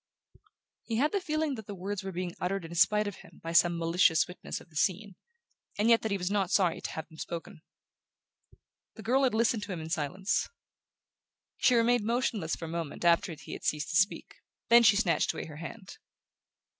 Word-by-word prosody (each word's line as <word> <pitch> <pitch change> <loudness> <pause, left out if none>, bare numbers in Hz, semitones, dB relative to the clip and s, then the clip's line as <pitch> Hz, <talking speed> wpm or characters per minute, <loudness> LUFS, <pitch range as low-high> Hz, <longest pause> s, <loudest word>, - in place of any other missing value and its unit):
He 230 - -4
had 285 +7 +2
the 400 - 0
feeling 310 -3 -1
that 220 -5 -8
the 205 - -6
words 195 +2 -4
were 190 - -4
being 180 -1 -4
uttered 190 0 -2
in 165 - -8
spite 210 +4 +3
of 205 -3 -5
him - - -16
by 165 - -4
some 170 0 +4
malicious 165 0 +3
witness 180 - -6
of 170 - -18
the - - -20
scene, 195 +4 0 0.6
and 210 +3 +2
yet 230 - +5
that 220 - -2
he 200 - 0
was 180 +1 -3
not 200 -3 +1
sorry 185 -4 +2
to - - -4
have 160 - -6
them 160 -1 -16
spoken. 165 -1 -7 1.3
The 220 - -10
girl 255 +4 +2
had 250 - +1
listened 225 -1 +2
to 210 -1 -6
him 175 - -4
in 160 0 -7
silence. 180 +5 -1 1.1
She 250 - +4
remained 235 0 +3
motionless 225 -7 -1
for 165 - -7
a - - -6
moment 165 0 -5
after 170 0 +3
he - - -9
had - - -8
ceased 150 0 -1
to - - -3
speak; 195 +4 +1 0.3
then 235 +1 +8
she 205 -3 +6
snatched 200 -5 +1
away - - -5
her 155 -2 -10
hand. 185 +4 -9
190 Hz, 205 wpm, -30 LUFS, 170-220 Hz, 1.3 s, then